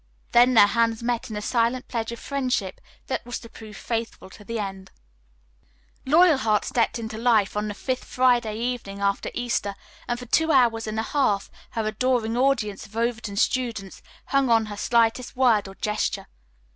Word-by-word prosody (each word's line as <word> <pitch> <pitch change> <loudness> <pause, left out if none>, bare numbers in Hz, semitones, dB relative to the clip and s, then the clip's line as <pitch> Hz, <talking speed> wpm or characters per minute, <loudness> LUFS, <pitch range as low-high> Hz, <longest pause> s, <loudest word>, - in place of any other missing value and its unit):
Then 245 +1 +5
their 215 - +9
hands 230 +2 +1
met 240 -1 -1
in 215 - -5
a 210 - -4
silent 240 +2 0
pledge 230 -1 -3
of 235 - -6
friendship 250 -9 -2 0.2
that 265 - -3
was 245 0 -5
to - - -10
prove 215 -2 -11
faithful 225 -4 -4
to 210 - -13
the 230 +2 -4
end. 195 -2 -5 1.2
Loyalheart 275 -9 +4
stepped 235 0 0
into 220 -1 -6
life 225 -5 +2
on 210 0 -1
the 205 - -5
fifth 255 +3 -3
Friday 245 -4 +2
evening 235 -4 -4
after 200 0 0
Easter 235 -5 -1 0.3
and 240 - -1
for 250 - -8
two 320 +6 +2
hours 235 -5 +3
and 215 +1 -2
a - - 0
half 225 -8 0 0.3
her 225 - 0
adoring 225 +1 0
audience 240 -6 +1
of 215 - -12
Overton 230 -3 -2
students 230 -4 -1 0.2
hung 275 -2 +1
on 225 -1 +4
her 205 -1 -7
slightest 235 +2 +1
word 235 -6 +3
or 195 - -11
gesture. 210 +1 -2
230 Hz, 175 wpm, -24 LUFS, 210-245 Hz, 1.2 s, their